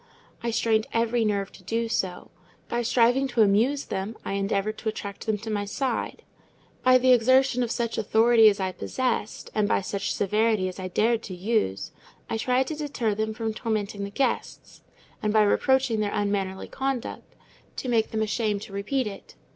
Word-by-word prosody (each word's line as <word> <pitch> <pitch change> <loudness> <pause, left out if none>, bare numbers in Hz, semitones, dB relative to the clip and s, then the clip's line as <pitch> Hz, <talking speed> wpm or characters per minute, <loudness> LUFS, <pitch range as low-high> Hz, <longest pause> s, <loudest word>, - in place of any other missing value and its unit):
I 235 - -2
strained 225 -1 +1
every 230 0 +1
nerve 200 -2 -1
to - - -16
do 230 0 -1
so: 185 -5 -3 0.4
by 240 - -1
striving 245 +3 +3
to 240 -3 +3
amuse 230 +8 +2
them, 195 +4 -4
I - - -3
endeavoured 200 +2 -1
to 220 - -2
attract 200 -1 -7
them 215 -1 +1
to 220 +2 -6
my 205 -1 -1
side; 250 +4 -3 0.6
by 255 0 +6
the 255 0 +4
exertion 255 +1 +4
of 240 - 0
such 235 -1 -2
authority 225 +1 +5
as 205 0 -2
I 190 -1 -1
possessed, 250 +1 -3
and 210 -1 +1
by - - +2
such 200 +1 -3
severity 210 -1 +1
as 185 +1 -7
I 185 - -4
dared 225 +5 +1
to 190 -5 -7
use, 180 - -1 0.4
I 225 - 0
tried 255 +3 +1
to 315 - -3
deter 285 -8 -1
them 220 +1 -2
from 225 -1 -2
tormenting 215 -3 -2
the 200 - -4
guests; 270 +7 -3 0.4
and 210 - 0
by 215 0 +5
reproaching 255 +2 +2
their 205 -1 -1
unmannerly 200 -2 -1
conduct, 270 -2 -4 0.4
to - - -5
make 230 -3 +2
them 220 0 -1
ashamed 215 -1 -1
to 195 - -11
repeat 240 +7 -1
it. 200 - -8
220 Hz, 185 wpm, -26 LUFS, 205-240 Hz, 0.6 s, by